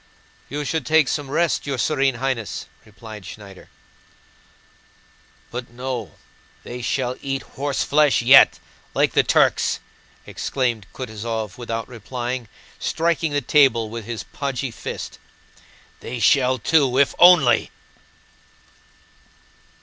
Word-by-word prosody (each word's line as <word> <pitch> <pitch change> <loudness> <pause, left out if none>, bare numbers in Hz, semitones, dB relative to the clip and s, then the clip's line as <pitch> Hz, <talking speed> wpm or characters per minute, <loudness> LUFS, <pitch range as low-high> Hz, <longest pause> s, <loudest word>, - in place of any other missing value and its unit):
"You 145 +1 -4
should 160 +2 -1
take 155 -3 +3
some 145 0 -2
rest, 160 -1 0
your 140 -2 -2
Serene 135 -1 +1
Highness," 125 -3 -3 0.2
replied 105 0 -11
Schneider. 100 +1 -12 1.8
"But 120 0 -6
no! 125 -2 -5 0.5
They 125 +1 -7
shall 125 +1 -2
eat 135 -1 -3
horseflesh 145 +1 +1
yet, 130 +3 +7 0.4
like - - +2
the - - +5
Turks!" - - +2 0.5
exclaimed 120 -6 -2
Kutúzov 110 -4 -5
without 115 -1 -4
replying, 120 +1 -5 0.3
striking 165 -2 0
the 145 0 0
table 120 -6 +3
with 115 -2 -6
his 115 -4 -5
podgy 135 0 -4
fist. - - -7 0.8
"They 125 - -6
shall 130 +1 +3
too, 135 0 +2
if 140 -1 +4
only..." 175 -9 +6
130 Hz, 110 wpm, -22 LUFS, 115-140 Hz, 1.8 s, yet